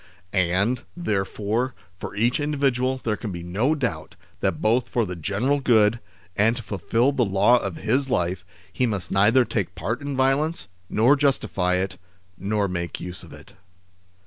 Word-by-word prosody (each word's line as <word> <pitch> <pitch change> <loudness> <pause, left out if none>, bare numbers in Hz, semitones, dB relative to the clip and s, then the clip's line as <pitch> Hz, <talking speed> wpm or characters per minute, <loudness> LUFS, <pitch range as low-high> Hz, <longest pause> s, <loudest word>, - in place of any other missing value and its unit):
And, 95 +6 +1 0.2
therefore, 110 - -1 0.2
for 95 - -7
each 120 +7 +1
individual 135 -3 0
there 110 -2 0
can 105 -1 -6
be 85 -1 -6
no 110 - +1
doubt 90 - -3 0.2
that - - 0
both 120 +3 +1
for 120 -2 +1
the 90 -2 -5
general 105 - 0
good, 115 -3 +3 0.4
and 115 +3 +3
to 120 - -6
fulfil 115 +6 +1
the 135 -3 +1
law 105 +4 +4
of 95 -6 -4
his 135 +4 0
life, 95 -5 0 0.3
he 125 - +1
must 100 -5 -3
neither 115 +6 +4
take 95 -6 -2
part 115 +6 -3
in 140 -1 -4
violence, 140 +5 +1 0.2
nor 120 +7 +4
justify 130 -10 +1
it, 95 +1 -2 0.4
nor 100 +2 -1
make 85 -2 -4
use 90 0 -7
of - - -13
it. - - -14
110 Hz, 165 wpm, -24 LUFS, 95-130 Hz, 0.4 s, law